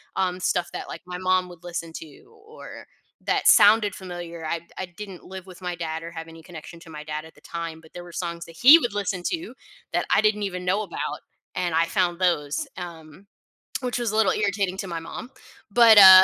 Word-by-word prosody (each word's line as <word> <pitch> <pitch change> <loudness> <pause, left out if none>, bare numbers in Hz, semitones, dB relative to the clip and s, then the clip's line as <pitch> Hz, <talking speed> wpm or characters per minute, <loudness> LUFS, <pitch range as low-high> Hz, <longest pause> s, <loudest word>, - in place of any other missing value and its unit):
um, 185 -1 0
stuff 180 -1 0
that, - - -5
like, - - -8
my 180 0 -6
mom 185 0 +2
would 175 -1 -14
listen 170 -2 -5
to 155 -3 -12 0.2
or 455 +2 -11 0.4
that - - +1
sounded 210 -3 +6
familiar. 175 -3 -7
I 165 +1 -1 0.2
I 185 - -3
didn't 185 +1 -10
live 190 0 -9
with 185 0 -13
my 180 -1 -3
dad 165 -1 -4
or 170 - -7
have 165 -1 -7
any 165 0 -13
connection 170 0 -10
to 165 - -14
my 150 -1 -8
dad 155 0 -4
at 160 - -15
the - - -20
time, 165 -1 -6
but 160 - -19
there 175 - -8
were 175 - -12
songs 170 -1 -4
that 165 -1 -14
he 285 +7 +11
would 240 -7 -2
listen 190 -3 -2
to 340 +1 -4 0.4
that - - +1
I - - +5
didn't 210 -1 +2
even 180 -2 -4
know 195 +4 +2
about, 210 - -4 0.3
and 180 -3 -1
I 165 +1 +3
found 180 -2 0
those, 150 -6 0
um, 170 +1 -9 0.5
which 245 -1 -2
was 235 -3 -1
a - - -3
little 220 -4 +4
irritating 200 -3 0
to 195 - -4
my 170 -1 -3
mom, 195 +8 -8 0.4
but, 225 0 +7
uh, 190 -1 +12
180 Hz, 220 wpm, -25 LUFS, 165-195 Hz, 0.5 s, uh